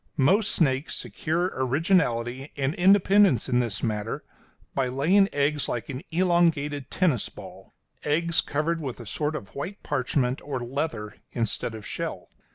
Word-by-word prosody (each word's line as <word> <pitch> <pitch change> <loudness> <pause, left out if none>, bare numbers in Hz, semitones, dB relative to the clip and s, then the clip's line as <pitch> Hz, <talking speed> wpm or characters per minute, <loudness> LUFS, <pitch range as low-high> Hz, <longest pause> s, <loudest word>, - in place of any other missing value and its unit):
Most 195 +10 +3
snakes 135 -2 +1
secure 170 +4 -1
originality 130 -2 +1
and 135 +1 0
independence 195 - +4
in 125 -2 +2
this 115 -4 -1
matter 110 -1 -2 0.5
by 135 -2 +1
laying 170 +11 +3
eggs 145 +1 +1
like 120 +2 -3
an 130 -1 -4
elongated 165 -5 +1
tennis 160 - +1
ball - - -12 0.3
eggs 165 +3 +2
covered 160 +3 -1
with 130 -5 -5
a 120 - -8
sort 150 +8 -2
of 100 -10 -7
white 190 +9 -6
parchment 130 -2 0
or 140 -3 -4
leather 120 -4 -4 0.2
instead 115 0 -1
of 110 -2 -9
shell. - - -4
140 Hz, 145 wpm, -26 LUFS, 125-170 Hz, 0.5 s, independence